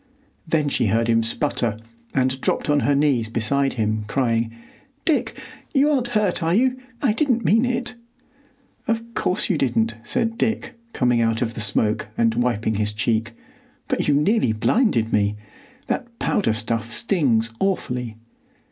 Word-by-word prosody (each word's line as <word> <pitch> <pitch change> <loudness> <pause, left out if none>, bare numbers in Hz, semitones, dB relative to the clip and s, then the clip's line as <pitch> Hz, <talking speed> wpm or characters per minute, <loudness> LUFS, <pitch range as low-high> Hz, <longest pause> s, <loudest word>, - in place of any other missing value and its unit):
Then 160 -2 +1
she 125 -5 +1
heard 115 +3 +1
him 115 -1 +3
sputter, 115 -1 -1 0.3
and 130 0 0
dropped - - 0
on 145 - +3
her 145 0 +2
knees 140 -6 +2
beside 135 +5 +1
him, 110 -2 -1
crying, 115 -2 0 0.5
"Dick, 320 - 0 0.4
you 285 +2 +4
aren't 255 -4 +1
hurt, 200 -4 +1
are 165 +2 +1
you? 255 +3 +2 0.2
I 240 -6 +3
didn't 245 -2 +1
mean 225 +4 +4
it." 245 0 -2 0.9
"Of 230 +1 -2
course 185 0 0
you 170 -6 0
didn't, 115 -4 +1
said 230 - -1
Dick, 225 +3 -1 0.2
coming 125 - +2
out 115 +1 +1
of 115 -1 -3
the 110 - -5
smoke 105 +1 +1
and 115 -1 +3
wiping 115 -2 0
his 105 0 -1
cheek. 115 +1 -1 0.5
"But - - -1
you 145 - +4
nearly 150 - +2
blinded 115 - +1
me. 105 0 +2 0.5
That 240 -2 -4
powder 195 - +1
stuff 115 0 -2
stings 120 - +1
awfully." 125 - -2
125 Hz, 155 wpm, -22 LUFS, -, 0.9 s, you